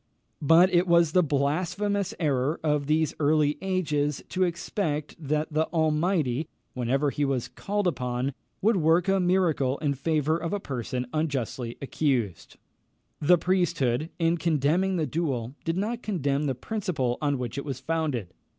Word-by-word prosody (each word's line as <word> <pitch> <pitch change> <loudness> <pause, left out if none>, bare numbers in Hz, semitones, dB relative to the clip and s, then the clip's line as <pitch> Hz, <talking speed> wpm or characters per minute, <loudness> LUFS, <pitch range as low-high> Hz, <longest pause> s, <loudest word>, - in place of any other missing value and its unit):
But 170 +5 +5
it 175 +1 +4
was 170 -2 +4
the 180 - +5
blasphemous 180 +7 0
error 145 -1 0
of 150 -2 +1
these 155 0 +2
early 150 0 +2
ages 150 -7 -1
to 185 - -3
expect 170 -3 -2
that 155 +1 -2
the 155 +1 +2
Almighty, 155 -3 +1 0.3
whenever 135 +4 0
he 145 - -1
was 135 -4 0
called 205 0 -3
upon, 125 -5 -1 0.3
would 220 0 +4
work 165 +2 +3
a 195 0 +3
miracle 175 -7 +2
in 145 -2 0
favour 155 +3 0
of 165 +2 -3
a 205 - 0
person 125 - -4
unjustly 135 -6 -2
accused. 120 - -1 0.6
The 175 +4 +5
priesthood, 165 -6 +1
in 165 0 +1
condemning 170 +4 +1
the 160 -3 0
duel, 135 -8 -2
did 165 +1 -1
not 225 +5 -2
condemn 145 - -1
the 135 - -1
principle 150 - -2
on 145 -2 +1
which 125 +1 -4
it - - -5
was 135 -4 -5
founded. 140 - -2
155 Hz, 150 wpm, -27 LUFS, 140-175 Hz, 0.6 s, But